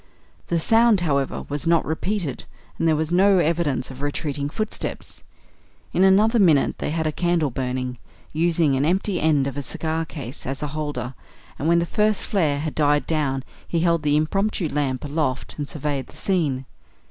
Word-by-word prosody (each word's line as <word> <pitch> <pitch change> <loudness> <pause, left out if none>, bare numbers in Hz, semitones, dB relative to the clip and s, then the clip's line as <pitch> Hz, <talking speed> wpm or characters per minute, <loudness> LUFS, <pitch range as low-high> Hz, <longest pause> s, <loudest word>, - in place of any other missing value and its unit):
The 170 - +1
sound, 225 +2 +4
however, 140 -5 -1
was 145 +3 -3
not 170 0 +3
repeated; 160 - -2 0.3
and 165 - +2
there 160 - +4
was 155 +1 -1
no 190 +2 +5
evidence 155 -7 0
of 130 +1 -10
retreating 145 0 -2
footsteps. 215 +7 -4 0.7
In 185 - +3
another 210 +5 +5
minute 160 -8 +3
they - - -2
had 160 +1 -1
a 155 - +1
candle 170 -3 +1
burning, 125 -1 -3 0.3
using 160 -2 +2
an 135 - +1
empty 185 +4 +1
end 150 -3 +3
of 140 0 -4
a - - -1
cigar 160 +3 -2
case 140 -4 -6
as 135 +3 -3
a 150 - -2
holder; 145 -5 -3 0.5
and 145 - -1
when 170 +1 +4
the 170 - +2
first 210 +2 +1
flare 150 -8 +1
had 155 -1 -3
died 145 -1 +2
down 140 -4 -1 0.2
he 170 - 0
held 170 -1 +2
the 150 0 +2
impromptu 195 +3 0
lamp 140 -2 -1
aloft 145 -3 -2
and 145 - -3
surveyed 145 -2 -3
the - - -15
scene. 150 -9 0
155 Hz, 180 wpm, -23 LUFS, 140-175 Hz, 0.7 s, no